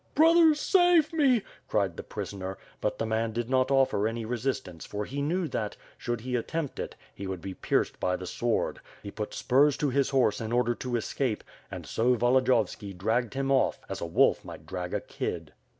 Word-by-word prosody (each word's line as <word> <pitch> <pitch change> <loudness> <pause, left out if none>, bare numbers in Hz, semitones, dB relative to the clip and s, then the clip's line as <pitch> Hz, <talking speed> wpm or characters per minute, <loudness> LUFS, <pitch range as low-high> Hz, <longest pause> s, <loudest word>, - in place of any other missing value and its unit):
"Brothers, 320 0 +6
save 350 -3 +4
me," 265 -9 +3 0.2
cried 100 -5 0
the - - -5
prisoner, 95 -1 -6 0.2
but - - -1
the - - -1
man 110 0 -1
did 120 +2 -3
not 130 -1 +3
offer 135 -6 +3
any 115 0 -3
resistance 120 -7 -3
for 105 0 -4
he 140 +5 -4
knew 170 +4 0
that, 105 -4 -3 0.2
should 120 -2 -3
he 125 +1 -3
attempt 145 +5 -3
it, - - -5 0.2
he 100 - -6
would 95 -1 -4
be 95 +2 -6
pierced - - 0
by 90 - +1
the 90 - -6
sword, 120 +5 -1 0.2
he 100 - -6
put 105 0 -5
spurs 140 +3 +3
to 145 -3 0
his 140 +1 +2
horse 130 -6 +2
in 110 0 -4
order 120 0 +2
to 125 0 -4
escape 120 0 -1
— - - -28
^and - - -6
so 125 +2 +2
Volodiyovski 120 -5 +1
dragged 110 +4 0
him 135 0 0
off, 135 - +2
as - - -5
a 85 - -2
wolf 85 - +3
might 75 - -10
drag 90 +1 -5
a - - -1
kid. - - -5
120 Hz, 200 wpm, -28 LUFS, 105-135 Hz, 0.2 s, Brothers